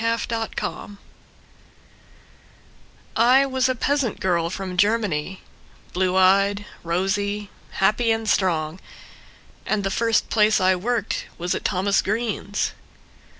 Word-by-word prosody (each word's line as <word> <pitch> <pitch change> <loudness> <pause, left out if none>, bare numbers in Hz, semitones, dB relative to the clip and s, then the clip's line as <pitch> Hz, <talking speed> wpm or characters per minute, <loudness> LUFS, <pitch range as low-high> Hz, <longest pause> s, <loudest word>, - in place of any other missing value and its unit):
Elsa 230 0 -1
Wertman 205 -1 -6 2.2
I 250 +4 +5
was 260 -1 0
a 255 - 0
peasant 275 -2 0
girl 170 -3 0
from 185 0 -5
Germany, 190 -4 0 0.5
Blue 185 0 +1
eyed, 200 +2 +3 0.2
rosy, 200 +4 -1 0.2
happy 215 +4 +2
and 225 0 -1
strong. 165 -4 0 0.8
And 210 -1 -1
the 195 - -1
first 230 +1 +1
place 215 -1 +4
I 185 0 +3
worked 220 +3 -2
was 175 +1 -2
at - - -4
Thomas 195 +1 +1
Greene's. 210 -1 -2
205 Hz, 110 wpm, -23 LUFS, 185-225 Hz, 2.2 s, I